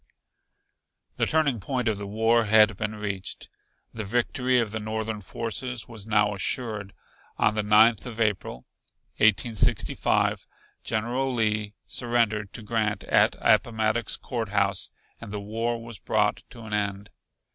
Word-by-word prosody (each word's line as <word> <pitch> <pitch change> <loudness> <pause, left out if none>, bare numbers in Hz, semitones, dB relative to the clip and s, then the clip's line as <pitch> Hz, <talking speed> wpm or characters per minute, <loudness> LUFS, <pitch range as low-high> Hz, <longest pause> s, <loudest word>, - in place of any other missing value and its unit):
The - - +1
turning 150 -7 +2
point 125 +4 -2
of 105 -2 0
the 100 - -5
war 110 +3 +2
had 110 0 +5
been 105 +2 -3
reached; 100 -3 -5 0.4
the 110 - -4
victory 125 +4 +1
of 115 -3 0
the 110 - -3
Northern 110 0 -3
forces 115 +4 -4
was 110 -3 -8
now 105 -1 +3
assured. 105 -1 -2 0.4
On 110 - +3
the 110 - 0
Ninth 110 +3 +4
of 115 -2 -8
April, 100 - -1 0.5
1865, 110 +1 +2 0.4
General 120 +5 -1
Lee 105 -3 -1
surrendered 115 -4 0
to 115 - -6
Grant 110 -1 -1
at - - +3
Appomattox 110 -1 +2
Court 115 -4 -4
House 100 -1 +1 0.3
and 115 -3 -9
the 105 - -3
war 115 +3 -2
was 115 -2 -9
brought 105 -1 0
to 115 - -12
an 105 -1 -7
end. 100 -1 -2
110 Hz, 140 wpm, -26 LUFS, 105-115 Hz, 0.5 s, had